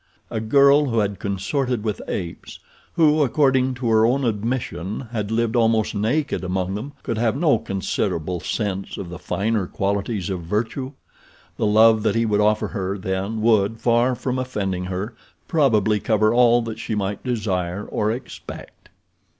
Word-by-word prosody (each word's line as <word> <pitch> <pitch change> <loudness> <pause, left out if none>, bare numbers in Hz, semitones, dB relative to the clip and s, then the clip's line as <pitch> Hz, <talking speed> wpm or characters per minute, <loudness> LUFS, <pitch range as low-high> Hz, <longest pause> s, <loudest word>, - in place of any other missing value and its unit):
A 115 - -1
girl 140 +6 +5
who 115 -3 -1
had 100 -3 0
consorted 105 +5 -1
with 105 -2 -2
apes, 85 -3 -5 0.4
who, 155 -2 +4
according 130 -2 +2
to 120 -1 -2
her 110 0 +4
own 130 +4 +2
admission, 110 -4 -2
had 105 -4 -3
lived 115 +1 0
almost 115 -2 +2
naked 120 +6 -1
among 90 +1 -2
them, 120 +8 -5
could 115 -2 -2
have 115 0 +1
no 145 -7 +3
considerable 90 -3 -2
sense 95 +1 -3
of 90 - -6
the 90 0 -8
finer 105 +1 -1
qualities 100 0 -2
of 90 -2 -3
virtue. 110 - -3 0.6
The 110 - +1
love 110 +1 +5
that 105 -2 +1
he 115 0 +2
would 105 -1 +2
offer 105 +1 +2
her, 100 -2 -3
then, 95 +3 -3
would, 110 -1 +3
far 120 +2 +2
from 130 +1 -2
offending 95 -8 -2
her, 95 +5 -4 0.3
probably 110 - +2
cover 110 0 +2
all 120 -1 +5
that 115 -1 -6
she 110 - -3
might 100 -1 -3
desire 100 -6 -2
or 105 - -1
expect. 120 +4 -8
110 Hz, 160 wpm, -22 LUFS, 100-120 Hz, 0.6 s, girl